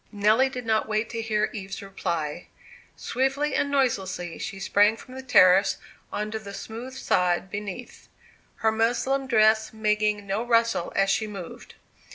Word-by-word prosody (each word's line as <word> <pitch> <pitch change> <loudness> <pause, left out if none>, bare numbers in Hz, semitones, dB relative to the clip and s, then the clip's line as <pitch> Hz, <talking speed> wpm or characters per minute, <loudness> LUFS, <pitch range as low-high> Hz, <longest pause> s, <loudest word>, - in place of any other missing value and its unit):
Nelly 215 +5 +3
did 250 -2 -7
not 220 -1 +1
wait 215 +1 -1
to 230 -1 -3
hear 215 -1 0
Eve's 195 -2 -6
reply. 170 -5 -4 0.5
Swiftly 270 +3 -1
and 285 - +1
noiselessly 190 -11 -1
she 195 - -5
sprang 205 +3 +3
from 255 - -13
the 265 - -7
terrace 195 -6 +5 0.3
on 210 0 -3
to 220 - -3
the 200 -2 -9
smooth 230 +6 -8
sod 180 -5 0
beneath, 205 +3 -7 0.6
her 220 - +5
muslin 245 +5 0
dress 220 -2 +3
making 210 -1 0
no 200 +2 -1
rustle 230 -6 +1
as 195 0 +3
she 215 +2 0
moved. 195 -5 -9
215 Hz, 155 wpm, -25 LUFS, 195-235 Hz, 0.6 s, terrace